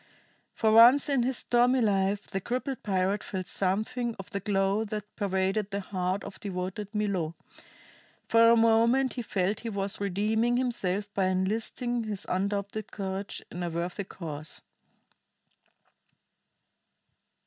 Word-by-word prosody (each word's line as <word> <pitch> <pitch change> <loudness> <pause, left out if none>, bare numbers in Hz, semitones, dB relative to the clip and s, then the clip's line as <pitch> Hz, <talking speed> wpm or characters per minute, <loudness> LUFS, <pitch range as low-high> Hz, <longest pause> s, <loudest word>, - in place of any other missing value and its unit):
For 220 - +2
once 240 +6 +7
in 275 -3 +2
his 250 +1 0
stormy 245 +2 +3
life 200 -2 +1
the 195 -1 -4
crippled 255 +4 -3
pirate 190 0 0
felt 185 -2 -4
something 220 +6 -1
of 195 - -9
the 200 - -2
glow 195 +1 +1
that 210 0 -6
pervaded 195 0 0
the 200 -1 -3
heart 185 0 -2
of 200 -1 -9
devoted 190 +1 -4
Milo: 195 -7 -1 0.9
for 230 0 +6
a 235 - +7
moment 230 +3 +4
he 250 - -3
felt 200 -2 -1
he 230 - -5
was 200 -1 -2
redeeming 215 +5 +1
himself 205 -5 -1
by 195 - +1
enlisting 225 +5 -1
his 210 -3 -5
undoubted 200 +2 -2
courage 195 0 -5
in 175 - -6
a 175 - -1
worthy 175 +4 -3
cause. 155 -5 -7
205 Hz, 135 wpm, -28 LUFS, 190-230 Hz, 0.9 s, once